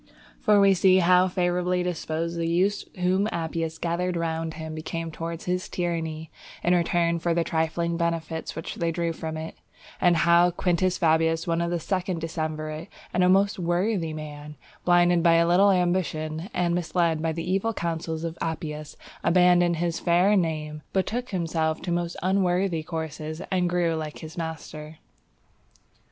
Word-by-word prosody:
For 210 Hz, -3 st, +4 dB
we 200 Hz, -1 st, +6 dB
see 185 Hz, 0 st, +5 dB
how 180 Hz, 0 st, +5 dB
favourably 180 Hz, 0 st, 0 dB
disposed 170 Hz, -1 st, -3 dB
the 165 Hz, -1 st, -1 dB
youths 185 Hz, +5 st, +1 dB, 0.2 s
whom 190 Hz, +4 st, +2 dB
Appius 165 Hz, -1 st, -3 dB
gathered 175 Hz, +2 st, -1 dB
round 165 Hz, -1 st, -2 dB
him 160 Hz, 0 st, -6 dB
became 165 Hz, +1 st, -4 dB
towards 165 Hz, +1 st, -6 dB
his 180 Hz, 0 st, -2 dB
tyranny, 160 Hz, -3 st, -3 dB, 0.3 s
in 175 Hz, -, +3 dB
return 170 Hz, -1 st, +2 dB
for 170 Hz, 0 st, 0 dB
the 170 Hz, -, +2 dB
trifling 165 Hz, +1 st, -1 dB
benefits 165 Hz, -1 st, -2 dB
which 160 Hz, -, -6 dB
they 170 Hz, -1 st, 0 dB
drew 170 Hz, 0 st, -1 dB
from 160 Hz, 0 st, -5 dB
it; 160 Hz, +1 st, -7 dB, 0.4 s
and 175 Hz, -1 st, +4 dB
how 170 Hz, +1 st, +5 dB
Quintus 180 Hz, +1 st, 0 dB
Fabius, 160 Hz, 0 st, +2 dB
one 170 Hz, 0 st, 0 dB
of 170 Hz, -, 0 dB
the 175 Hz, 0 st, -1 dB
second 185 Hz, 0 st, -2 dB
decemvirate 155 Hz, -1 st, -4 dB, 0.3 s
and 180 Hz, -, +2 dB
a 180 Hz, -, +4 dB
most 195 Hz, +1 st, +3 dB
worthy 175 Hz, 0 st, 0 dB
man, 150 Hz, -1 st, -8 dB, 0.3 s
blinded 175 Hz, -1 st, +4 dB
by 170 Hz, 0 st, +5 dB
a 170 Hz, 0 st, +4 dB
little 185 Hz, +4 st, +5 dB
ambition, 175 Hz, -2 st, -1 dB
and 175 Hz, -1 st, 0 dB
misled 170 Hz, -2 st, 0 dB
by 165 Hz, 0 st, 0 dB
the 165 Hz, +1 st, -5 dB
evil 195 Hz, +5 st, +1 dB
counsels 165 Hz, -4 st, -3 dB
of 165 Hz, 0 st, -5 dB
Appius, 155 Hz, -2 st, -4 dB, 0.3 s
abandoning 175 Hz, -1 st, +4 dB
his 170 Hz, -1 st, -1 dB
fair 175 Hz, +3 st, +3 dB
fame, 155 Hz, -4 st, -1 dB
betook 235 Hz, +6 st, -1 dB
himself 160 Hz, -4 st, -1 dB
to 175 Hz, -, -3 dB
most 175 Hz, 0 st, -2 dB
unworthy 185 Hz, -2 st, +1 dB
courses, 155 Hz, -1 st, -5 dB
and 180 Hz, -2 st, +1 dB
grew 175 Hz, -1 st, +1 dB
like 155 Hz, -2 st, -4 dB
his 160 Hz, +1 st, -9 dB
master. 160 Hz, -2 st, -6 dB
170 Hz, 160 wpm, -26 LUFS, 160-180 Hz, 0.4 s, we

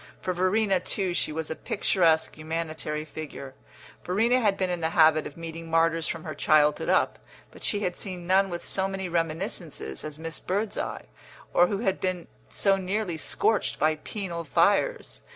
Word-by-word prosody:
For 185 Hz, -, -2 dB
Verena, 190 Hz, +2 st, +2 dB
too, 185 Hz, 0 st, -2 dB
she 175 Hz, -, 0 dB
was 160 Hz, 0 st, -4 dB
a -, -, -2 dB
picturesque 165 Hz, -5 st, +1 dB
humanitary 155 Hz, -1 st, -3 dB
figure. 150 Hz, -4 st, -8 dB, 0.5 s
Verena 230 Hz, +7 st, +2 dB
had 205 Hz, -5 st, +2 dB
been 185 Hz, -2 st, 0 dB
in 175 Hz, -, -2 dB
the 160 Hz, -, +1 dB
habit 155 Hz, -1 st, +5 dB
of 145 Hz, -, -12 dB
meeting 165 Hz, 0 st, -7 dB
martyrs 165 Hz, 0 st, +2 dB
from 165 Hz, -2 st, -4 dB
her 155 Hz, -, -5 dB
childhood 150 Hz, 0 st, +3 dB
up, -, -, +2 dB, 0.3 s
but -, -, -15 dB
she 205 Hz, -, +1 dB
had 180 Hz, -3 st, -1 dB
seen 180 Hz, -3 st, -2 dB
none 190 Hz, +2 st, +3 dB
with 175 Hz, -1 st, -5 dB
so 190 Hz, 0 st, 0 dB
many 195 Hz, -1 st, -4 dB
reminiscences 165 Hz, -, -3 dB
as 155 Hz, -1 st, -6 dB
Miss 165 Hz, 0 st, -4 dB
Birdseye, 200 Hz, +3 st, -2 dB, 0.5 s
or 175 Hz, -, +6 dB
who 200 Hz, -, -1 dB
had 195 Hz, -5 st, 0 dB
been 185 Hz, -2 st, -2 dB, 0.2 s
so 195 Hz, -1 st, +2 dB
nearly 190 Hz, -1 st, -2 dB
scorched 215 Hz, +6 st, +1 dB
by 155 Hz, +1 st, +3 dB
penal 170 Hz, 0 st, -5 dB
fires. 150 Hz, -, +1 dB
175 Hz, 170 wpm, -27 LUFS, 160-195 Hz, 0.5 s, or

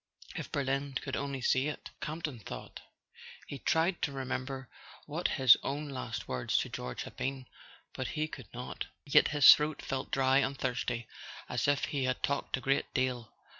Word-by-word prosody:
"If -, -, -5 dB
Berlin 140 Hz, 0 st, -1 dB
could 130 Hz, -, -4 dB
only 140 Hz, -2 st, -3 dB
see 130 Hz, +2 st, +2 dB
it!" 150 Hz, -, -6 dB
Campton 155 Hz, -5 st, -4 dB
thought. 105 Hz, -, -8 dB, 0.7 s
He 140 Hz, -, -7 dB
tried 170 Hz, +5 st, +1 dB
to 145 Hz, -, 0 dB
remember 135 Hz, 0 st, -4 dB, 0.4 s
what 155 Hz, +4 st, -1 dB
his 130 Hz, -3 st, +8 dB
own 145 Hz, +2 st, -3 dB
last 130 Hz, -2 st, -5 dB
words 65 Hz, -1 st, 0 dB
to -, -, 0 dB
George 60 Hz, 0 st, -5 dB
had -, -, -10 dB
been, 135 Hz, -1 st, -3 dB, 0.5 s
but 130 Hz, -, -3 dB, 0.2 s
could 125 Hz, -8 st, -9 dB
not; 125 Hz, +1 st, -5 dB, 0.2 s
yet 140 Hz, -, +6 dB
his 145 Hz, -2 st, +9 dB
throat 150 Hz, 0 st, -1 dB
felt 135 Hz, -1 st, -3 dB
dry 135 Hz, 0 st, +4 dB
and 135 Hz, 0 st, 0 dB
thirsty, 120 Hz, -2 st, -2 dB, 0.4 s
as -, -, 0 dB
if 145 Hz, -1 st, +2 dB
he 140 Hz, -3 st, -1 dB
had 130 Hz, 0 st, -1 dB
talked 140 Hz, -1 st, 0 dB
a -, -, -7 dB
great 135 Hz, +2 st, +1 dB
deal. 125 Hz, -4 st, 0 dB
135 Hz, 170 wpm, -32 LUFS, 130-140 Hz, 0.7 s, his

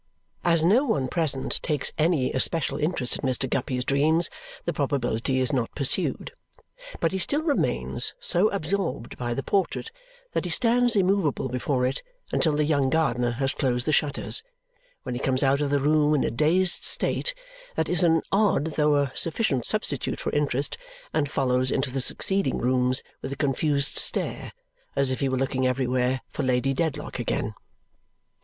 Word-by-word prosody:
As 165 Hz, -2 st, +3 dB
no 220 Hz, +10 st, +4 dB
one 145 Hz, -, 0 dB
present 140 Hz, -3 st, -1 dB
takes 150 Hz, -4 st, 0 dB
any 155 Hz, -5 st, +1 dB
especial 140 Hz, +1 st, +1 dB
interest 150 Hz, -5 st, 0 dB
in 135 Hz, -, -1 dB
Mr. 130 Hz, +1 st, 0 dB
Guppy's 125 Hz, -1 st, -2 dB
dreams, 155 Hz, +4 st, +1 dB, 0.3 s
the -, -, -1 dB
probability 130 Hz, -3 st, -1 dB
is 130 Hz, +3 st, 0 dB
not 125 Hz, -4 st, -2 dB
pursued. 140 Hz, -, 0 dB, 0.7 s
But 165 Hz, -, +1 dB
he 190 Hz, -, -2 dB
still 290 Hz, +10 st, +1 dB
remains 300 Hz, -4 st, +1 dB
so 210 Hz, -, +4 dB
absorbed 195 Hz, -8 st, -3 dB
by 120 Hz, -1 st, -2 dB
the 135 Hz, -, -3 dB
portrait 200 Hz, -, -1 dB, 0.4 s
that -, -, -1 dB
he -, -, -2 dB
stands 240 Hz, +5 st, +3 dB
immovable 185 Hz, -9 st, +1 dB
before 125 Hz, +1 st, -1 dB
it 130 Hz, -, -1 dB, 0.3 s
until 155 Hz, -3 st, +1 dB
the 150 Hz, -, +1 dB
young 140 Hz, -3 st, +1 dB
gardener 125 Hz, -6 st, 0 dB
has 135 Hz, +2 st, 0 dB
closed 125 Hz, -3 st, -1 dB
the -, -, +1 dB
shutters, 150 Hz, -, +1 dB, 0.6 s
when -, -, -5 dB
he 120 Hz, -, -4 dB
comes 130 Hz, 0 st, +1 dB
out 140 Hz, +1 st, +2 dB
of 145 Hz, -, 0 dB
the 145 Hz, 0 st, +1 dB
room 150 Hz, +1 st, +2 dB
in 140 Hz, -, +1 dB
a -, -, -1 dB
dazed 175 Hz, +9 st, +2 dB
state -, -, 0 dB, 0.4 s
that -, -, 0 dB
is 180 Hz, -, +2 dB
an 165 Hz, -2 st, +3 dB
odd 200 Hz, -6 st, +2 dB
though 150 Hz, -1 st, +3 dB
a 140 Hz, -2 st, +1 dB
sufficient 160 Hz, -, 0 dB
substitute -, -, -1 dB
for -, -, -3 dB
interest 145 Hz, -, -1 dB, 0.3 s
and 145 Hz, -1 st, 0 dB
follows 130 Hz, -2 st, +1 dB
into 130 Hz, 0 st, -1 dB
the 135 Hz, +1 st, -1 dB
succeeding 195 Hz, +9 st, +2 dB
rooms 125 Hz, +1 st, +1 dB, 0.2 s
with 135 Hz, -, -6 dB
a -, -, -3 dB
confused 140 Hz, 0 st, 0 dB
stare, -, -, 0 dB, 0.4 s
as 135 Hz, -1 st, +2 dB
if 130 Hz, -, -2 dB
he 135 Hz, -, 0 dB
were 130 Hz, -, -1 dB
looking 130 Hz, 0 st, 0 dB
everywhere 125 Hz, 0 st, 0 dB
for -, -, -5 dB
Lady 130 Hz, +1 st, +1 dB
Dedlock 160 Hz, +2 st, -3 dB
again. -, -, -2 dB
140 Hz, 170 wpm, -25 LUFS, 130-165 Hz, 0.7 s, no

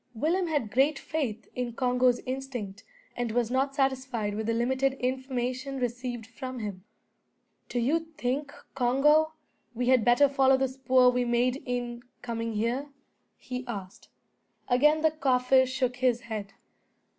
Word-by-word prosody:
Willem 340 Hz, +9 st, +1 dB
had 290 Hz, -10 st, -1 dB
great 275 Hz, +4 st, +3 dB
faith 235 Hz, -9 st, -3 dB
in 245 Hz, -1 st, -3 dB
Congo's 250 Hz, 0 st, +2 dB
instinct, 255 Hz, -6 st, -5 dB, 0.3 s
and 240 Hz, -2 st, -2 dB
was 240 Hz, 0 st, 0 dB
not 270 Hz, +2 st, 0 dB
satisfied 260 Hz, -6 st, 0 dB
with 215 Hz, +1 st, -3 dB
the 230 Hz, -, +1 dB
limited 260 Hz, +3 st, +1 dB
information 260 Hz, +1 st, -3 dB
received 245 Hz, -2 st, -3 dB
from 255 Hz, +2 st, -7 dB
him. 205 Hz, -5 st, -5 dB, 0.9 s
"Do -, -, -3 dB
you 270 Hz, +8 st, +2 dB, 0.2 s
think, 275 Hz, +4 st, -2 dB, 0.2 s
Congo, 295 Hz, +5 st, +3 dB, 0.4 s
we 245 Hz, +2 st, 0 dB
had 255 Hz, -3 st, +5 dB
better 245 Hz, +5 st, +5 dB
follow 270 Hz, -1 st, +4 dB
the 265 Hz, 0 st, 0 dB
spoor 260 Hz, -1 st, +4 dB
we 250 Hz, 0 st, +1 dB
made 245 Hz, +2 st, +1 dB
in 245 Hz, -1 st, -3 dB, 0.2 s
coming 230 Hz, -1 st, -3 dB
here?" 235 Hz, +7 st, -1 dB, 0.5 s
he 250 Hz, 0 st, -6 dB
asked. 200 Hz, -5 st, -7 dB, 0.6 s
Again 300 Hz, +5 st, +4 dB
the 315 Hz, 0 st, +4 dB
Kaffir 260 Hz, -3 st, +3 dB
shook 255 Hz, -1 st, -1 dB
his 250 Hz, -2 st, +2 dB
head. 215 Hz, -4 st, -6 dB
250 Hz, 145 wpm, -28 LUFS, 240-270 Hz, 0.9 s, had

